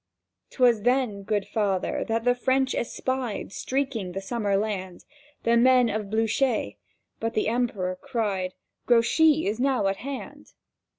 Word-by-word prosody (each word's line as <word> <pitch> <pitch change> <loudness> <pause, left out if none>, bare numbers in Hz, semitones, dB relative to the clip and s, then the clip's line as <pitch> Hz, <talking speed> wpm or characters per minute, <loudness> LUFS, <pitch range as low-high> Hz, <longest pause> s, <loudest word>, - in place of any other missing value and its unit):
'Twas 240 -4 +3
then, 245 -3 +1
Good 205 0 -1
Father, 200 -4 -1
that 225 0 0
the 245 0 +4
French 260 +1 +1
espied, 250 -4 -3
Streaking 255 -7 -2
the 195 - -3
summer 200 0 -1
land, 195 -4 -4 0.4
The 230 0 +3
men 250 0 +5
of 215 -1 -3
Blücher. 225 +3 0 0.4
But 225 0 -3
the 215 - +1
Emperor 210 -6 -1
cried, 205 -8 -2 0.3
"Grouchy 300 +7 +4
is 215 +3 -1
now 260 -4 +1
at 195 0 +1
hand!" 275 +3 -8
225 Hz, 135 wpm, -26 LUFS, 200-255 Hz, 0.4 s, men